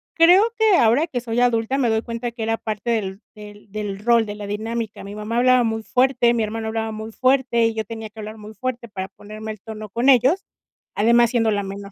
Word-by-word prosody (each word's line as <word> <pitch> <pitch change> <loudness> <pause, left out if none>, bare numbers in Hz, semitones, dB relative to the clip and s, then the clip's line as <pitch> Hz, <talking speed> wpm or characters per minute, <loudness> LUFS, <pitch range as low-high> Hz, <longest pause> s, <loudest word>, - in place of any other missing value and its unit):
creo 355 +5 +7
que 440 -3 +4
ahora 240 +9 +3
que 245 -5 -3
soy 235 0 -2
adulta 245 +1 +1
me 240 -3 +2
doy 220 0 +1
cuenta 235 0 -4
que 230 -1 -6
era 225 0 0
parte 215 +1 -4
del 200 -2 -2
del 205 -1 -13
del 205 -2 -4
rol, 235 +1 +3
de 205 - -5
la 205 -1 -7
dinámica. 220 +1 -4
Mi 200 +1 -8
mamá 215 +2 -3
hablaba 250 0 +4
muy 225 -1 -1
fuerte, 250 -1 +2
mi 225 - +1
hermano 220 +1 -4
hablaba 220 0 -2
muy 220 +1 -7
fuerte 255 -1 +2
y 225 - +1
yo 220 - -2
tenía 220 0 -7
que 220 - -14
hablar 215 +1 -7
muy 210 +1 -11
fuerte 240 +2 -4
para 190 -2 -5
ponerme 215 +2 -9
al 215 - -9
tono 215 -1 -8
con 235 +7 +1
ellos, 270 - +4 0.5
además 235 +2 +4
siendo 225 -3 +2
la 205 -1 0
menor. 200 +1 -7
225 Hz, 230 wpm, -22 LUFS, 210-240 Hz, 0.5 s, creo